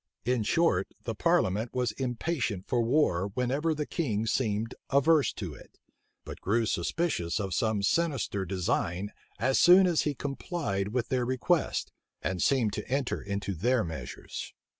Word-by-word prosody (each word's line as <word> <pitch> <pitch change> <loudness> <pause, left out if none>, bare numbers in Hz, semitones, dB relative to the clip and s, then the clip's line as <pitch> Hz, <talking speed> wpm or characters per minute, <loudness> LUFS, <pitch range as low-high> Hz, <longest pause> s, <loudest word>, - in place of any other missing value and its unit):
In 125 -1 +1
short, 105 - +2 0.2
the - - -3
parliament 105 +7 +1
was 125 -3 +1
impatient 125 - -2
for 120 - +1
war 115 - +2
whenever 140 +6 0
the 150 0 -2
king 115 - -1
seemed 110 -1 0 0.2
averse 140 +2 +4
to 90 -8 -6
it; - - -15 0.5
but - - -8
grew 115 +4 +1
suspicious 95 - -1
of 95 -3 -2
some 110 +2 0
sinister 135 -7 0
design 95 +1 -1 0.3
as 130 0 +2
soon 185 +2 +8
as 175 -3 +3
he 150 -2 -1
complied 135 - -3
with 120 +3 -2
their 130 -2 +1
requests, 130 +7 0 0.3
and 95 -2 -1
seemed 120 -7 +2
to - - -4
enter 135 0 -1
into 100 0 -3
their 120 +7 +1
measures. 80 -8 -7
120 Hz, 150 wpm, -29 LUFS, 100-140 Hz, 0.5 s, soon